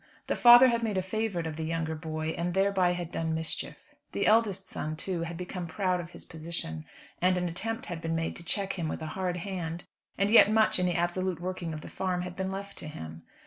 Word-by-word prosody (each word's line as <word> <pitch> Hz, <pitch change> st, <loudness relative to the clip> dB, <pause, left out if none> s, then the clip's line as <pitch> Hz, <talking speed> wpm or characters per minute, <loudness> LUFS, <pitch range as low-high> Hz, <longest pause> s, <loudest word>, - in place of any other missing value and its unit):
The -, -, 0 dB
father 240 Hz, +2 st, +9 dB
had 235 Hz, -1 st, +1 dB
made 215 Hz, -4 st, -1 dB
a 185 Hz, -, +1 dB
favourite 195 Hz, -3 st, -2 dB
of 160 Hz, -1 st, -4 dB
the 160 Hz, -, -3 dB
younger 160 Hz, 0 st, -1 dB
boy, 155 Hz, 0 st, -3 dB
and 170 Hz, +2 st, -2 dB
thereby 190 Hz, -2 st, +3 dB
had 175 Hz, -1 st, -5 dB
done 160 Hz, -1 st, -1 dB
mischief. 160 Hz, 0 st, -4 dB, 0.2 s
The -, -, 0 dB
eldest 210 Hz, -3 st, +3 dB
son, 155 Hz, +1 st, -4 dB
too, 175 Hz, +2 st, -3 dB
had 170 Hz, 0 st, -4 dB
become 180 Hz, 0 st, -5 dB
proud 185 Hz, +1 st, 0 dB
of 170 Hz, -1 st, -6 dB
his -, -, -11 dB
position, 155 Hz, -, -4 dB, 0.4 s
and 185 Hz, +1 st, +4 dB
an 180 Hz, 0 st, 0 dB
attempt 225 Hz, +9 st, -3 dB
had 170 Hz, -2 st, -5 dB
been 165 Hz, 0 st, -1 dB
made 165 Hz, 0 st, -2 dB
to 170 Hz, -, -9 dB
check 195 Hz, +2 st, -1 dB
him 165 Hz, -, -1 dB
with 155 Hz, -, -4 dB
a 155 Hz, -, -5 dB
hard 185 Hz, -2 st, -1 dB
hand; 175 Hz, -2 st, -4 dB, 0.3 s
and 200 Hz, +2 st, +2 dB
yet 225 Hz, -3 st, +8 dB
much 220 Hz, -3 st, +3 dB
in 180 Hz, -, +2 dB
the 175 Hz, -, 0 dB
absolute 175 Hz, 0 st, 0 dB
working 180 Hz, -2 st, -4 dB
of 155 Hz, -1 st, -5 dB
the -, -, -9 dB
farm 180 Hz, -1 st, -2 dB
had 180 Hz, 0 st, -6 dB
been 190 Hz, 0 st, -2 dB
left 200 Hz, +1 st, -6 dB
to -, -, -7 dB
him. 80 Hz, -, -8 dB
180 Hz, 235 wpm, -29 LUFS, 165-195 Hz, 0.4 s, father